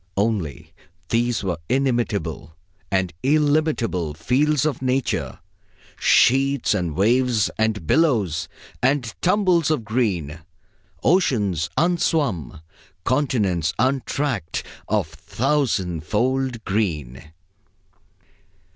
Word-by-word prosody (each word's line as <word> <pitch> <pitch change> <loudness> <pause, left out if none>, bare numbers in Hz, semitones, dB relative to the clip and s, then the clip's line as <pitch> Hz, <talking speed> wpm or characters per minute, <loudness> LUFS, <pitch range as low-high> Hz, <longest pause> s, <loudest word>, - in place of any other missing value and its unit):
Only, 100 -8 -2 0.4
these 120 -1 0
were 90 -4 -2
the - - +1
inimitable 105 - -1 0.3
and 95 -3 0
illimitable 145 - +1
fields 140 - +1
of 145 -5 -1
Nature. 130 0 -1 0.6
Sheets 135 0 +3
and 90 -6 -2
waves 115 +3 +2
and 110 -5 0
billows 100 - +1 0.3
and 125 -2 +1
tumbles 180 -4 +2
of 150 -8 0
green; 95 - -1 0.6
oceans 105 - +2
unswum, 145 - 0 0.4
continents 105 - 0
untracked, 130 - -1 0.2
of - - +1
thousandfold 115 - -1
green. 80 - -2
115 Hz, 85 wpm, -22 LUFS, 90-135 Hz, 0.6 s, Sheets